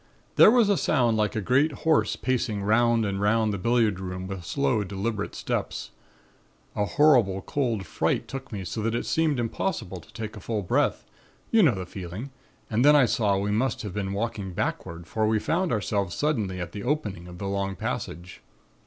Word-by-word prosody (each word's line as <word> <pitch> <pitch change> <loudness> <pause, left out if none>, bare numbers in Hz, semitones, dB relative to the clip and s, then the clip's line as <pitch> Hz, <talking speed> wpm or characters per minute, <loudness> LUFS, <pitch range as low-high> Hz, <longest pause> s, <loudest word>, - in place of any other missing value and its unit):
"There - - +8
was 235 -2 +5
a 200 -2 +3
sound 120 -9 +2
like 105 -2 0
a 110 - 0
great 135 +9 +3
horse 160 -1 +3
pacing 115 -5 -1
'round 115 +2 +3
and 100 -1 -2
'round 110 +1 +2
the 100 - -3
billiard 115 -2 +2
room 90 0 -5
with 95 -2 -6
slow, 130 - 0
deliberate 105 +2 -3
steps. - - -3 0.8
A 105 - +1
horrible 115 -8 +3
cold 120 -8 -1
fright - - -1
took 135 -1 -7
me 100 -4 -5
so 110 +6 -4
that 115 +2 0
it - - -2
seemed 155 -5 +1
impossible 115 - -2
to - - -18
take 110 -2 -6
a - - -8
full 105 0 -3
breath, 90 - +1 0.5
you 225 - +5
know 145 - +5
the 95 -1 -5
feeling, 95 +8 -7 0.4
and 115 +2 +1
then 150 +1 +7
I 140 -3 +6
saw 105 -4 +1
we 100 +1 -1
must 115 +4 0
have 105 -4 -5
been 100 -1 -3
walking 100 -2 -3
backward 85 0 -3
for 110 +4 0
we 110 0 +2
found 170 - 0
ourselves 100 -4 -1
suddenly 110 -12 -1
at 85 -1 -5
the 100 - -6
opening 105 - -2
of 90 0 -10
the 100 - -4
long 100 0 -2
passage. 85 0 -5
110 Hz, 195 wpm, -26 LUFS, 95-125 Hz, 0.8 s, There